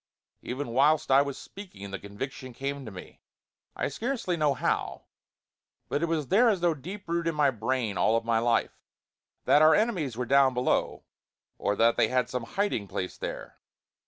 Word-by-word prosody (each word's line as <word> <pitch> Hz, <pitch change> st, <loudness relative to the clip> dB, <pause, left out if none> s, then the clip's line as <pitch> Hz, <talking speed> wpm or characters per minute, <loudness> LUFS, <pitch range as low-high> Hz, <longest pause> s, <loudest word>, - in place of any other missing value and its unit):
even 130 Hz, +1 st, -4 dB
whilst 145 Hz, +5 st, +3 dB
I 135 Hz, +1 st, +7 dB
was 140 Hz, -1 st, -3 dB
speaking 100 Hz, -, -10 dB
the 100 Hz, -, -5 dB
conviction 130 Hz, +5 st, -7 dB
came 140 Hz, +2 st, -4 dB
to 110 Hz, -, -7 dB
me 90 Hz, -2 st, -11 dB, 0.5 s
I -, -, -1 dB
scarcely 225 Hz, -, -2 dB
know 150 Hz, -4 st, +1 dB
how, -, -, -2 dB, 0.9 s
but 145 Hz, -, -1 dB
it 170 Hz, -, +1 dB
was 160 Hz, -4 st, -2 dB
there 230 Hz, +6 st, +5 dB
as 200 Hz, -4 st, +1 dB
though 175 Hz, -1 st, +2 dB
deep 185 Hz, +8 st, -9 dB
rooted 170 Hz, 0 st, 0 dB
in 165 Hz, -, -4 dB
my 145 Hz, -2 st, +3 dB
brain 115 Hz, -3 st, -2 dB
all 115 Hz, +1 st, +3 dB
my 115 Hz, 0 st, +1 dB
life 115 Hz, 0 st, 0 dB, 0.7 s
that 145 Hz, -, +5 dB
our 155 Hz, 0 st, +7 dB
enemies 180 Hz, -, 0 dB
were 125 Hz, -, -2 dB
down 135 Hz, 0 st, +4 dB
below, 125 Hz, +1 st, 0 dB, 0.6 s
or 105 Hz, -, 0 dB
that 115 Hz, +2 st, +3 dB
they -, -, +4 dB
had 125 Hz, 0 st, 0 dB
some 125 Hz, -2 st, -3 dB
hiding 200 Hz, -, 0 dB
place 90 Hz, -1 st, -4 dB
there. -, -, -7 dB
135 Hz, 180 wpm, -28 LUFS, 115-165 Hz, 0.9 s, I